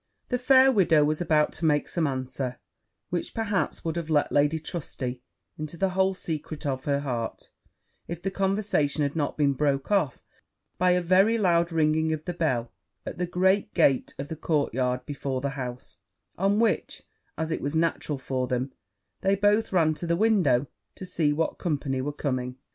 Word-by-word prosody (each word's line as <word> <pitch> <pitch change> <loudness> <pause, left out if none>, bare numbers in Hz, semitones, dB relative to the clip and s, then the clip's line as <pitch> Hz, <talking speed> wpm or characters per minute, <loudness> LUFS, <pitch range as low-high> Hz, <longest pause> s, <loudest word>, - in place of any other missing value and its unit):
The 250 - 0
fair 260 +1 +6
widow 170 - +4
was 155 +2 0
about 155 -3 +2
to 165 - -3
make 150 -2 +2
some 165 -3 0
answer, 130 -1 -3 0.5
which 175 -1 -3
perhaps 205 -7 -1
would 165 -1 -1
have 165 -2 -4
let 150 -2 +2
Lady 145 +2 +3
Trusty 130 -6 -5 0.4
into 155 +2 -5
the 195 +2 +1
whole 190 +1 +1
secret 155 -3 -5
of 130 -2 -2
her 140 -1 +1
heart, 120 -5 -4 0.6
if 170 -1 -5
the 195 +2 -3
conversation 195 -7 0
had 140 +1 -1
not 150 -3 -1
been 145 -2 +3
broke 140 +3 0
off 180 - +1 0.6
by 180 0 +4
a 180 0 +3
very 190 +6 +4
loud 170 -4 +2
ringing 160 0 +2
of 155 0 -5
the 180 - -3
bell 130 -9 -1 0.3
at - - -6
the 180 - 0
great 190 +4 +1
gate 140 -6 +2
of 140 - -5
the 160 - -5
courtyard 130 -5 0
before 135 -2 -3
the 140 +2 -2
house; 125 -2 -6 0.4
on 195 +3 +1
which, 230 -1 0 0.3
as 160 0 -2
it - - -2
was 145 +3 -3
natural 160 -2 0
for 130 -1 -2
them, 130 +2 -2 0.5
they 195 +1 +3
both 205 +2 +2
ran 165 -4 +3
to 170 +3 -5
the 170 - +2
window 180 - +3 0.3
to 185 - -8
see 165 -5 +1
what 160 +2 -1
company 140 -6 -1
were 145 +3 -2
coming. 130 -3 -3
155 Hz, 180 wpm, -26 LUFS, 140-180 Hz, 0.6 s, fair